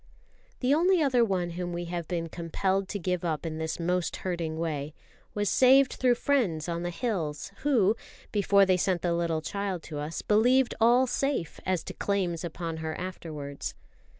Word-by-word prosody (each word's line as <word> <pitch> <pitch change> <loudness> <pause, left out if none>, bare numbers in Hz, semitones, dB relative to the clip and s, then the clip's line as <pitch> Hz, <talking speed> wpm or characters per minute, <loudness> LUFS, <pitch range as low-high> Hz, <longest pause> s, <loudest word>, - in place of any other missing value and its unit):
The 255 +2 +3
only 355 +4 +4
other 255 -4 +4
one 185 -5 0
whom 175 0 -4
we 175 0 -3
have 170 -1 -4
been 170 -2 -2
compelled 190 +4 -1
to 205 - -2
give 180 -1 -2
up 160 -2 -2
in 160 -1 -4
this 160 +1 -3
most 180 +1 0
hurting 170 -4 -3
way 155 -2 -3 0.4
was 205 0 0
saved 265 +4 +5
through 250 -1 +3
friends 210 - +1
on 170 0 -2
the 175 - -2
hills, 170 -6 -3
who, 230 -8 +3 0.4
before 200 -1 +4
they 185 -1 +3
sent 180 -1 0
the 175 -1 +1
little 165 -2 -1
child 195 -2 -3
to 150 -3 -6
us, 150 +3 -4
believed 245 +4 +4
all 240 +3 +6
safe 265 - -1
as 185 -3 +1
to - - -7
claims 185 -5 -1
upon 165 -1 -4
her 160 0 -4
afterwards. 155 -6 -6
180 Hz, 180 wpm, -28 LUFS, 165-210 Hz, 0.4 s, all